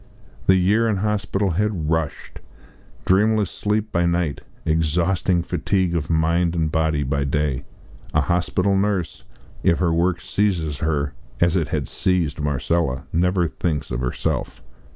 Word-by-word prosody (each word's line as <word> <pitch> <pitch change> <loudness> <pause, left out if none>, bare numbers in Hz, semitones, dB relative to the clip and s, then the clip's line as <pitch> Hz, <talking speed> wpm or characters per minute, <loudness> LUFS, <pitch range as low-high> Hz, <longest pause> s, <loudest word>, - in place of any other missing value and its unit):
The 95 - +6
year 100 +5 +3
in 110 - +1
hospital 100 -1 0
had 90 -4 -1
rushed 80 -3 -2 0.7
dreamless 105 +1 +3
sleep 105 +1 -1
by 85 0 +2
night, 85 -4 0 0.2
exhausting 85 +3 +1
fatigue 95 0 0
of 75 -3 -2
mind 85 +1 +2
and 80 -2 0
body 80 -2 +1
by 70 +1 0
day. 70 -1 -1 0.5
A - - +3
hospital 90 +3 +1
nurse, 95 -9 -1 0.4
if 85 - +3
her 85 -3 +1
work 85 +1 +1
seizes 85 -8 -1
her, 70 -3 -1 0.3
as 85 +1 +3
it 85 -4 +1
had 75 -3 -2
seized 85 -6 0
Marcella, 70 -1 0
never 90 +1 +2
thinks 75 -4 -3
of 65 - -2
herself. 65 -1 -2
85 Hz, 140 wpm, -22 LUFS, 75-95 Hz, 0.7 s, The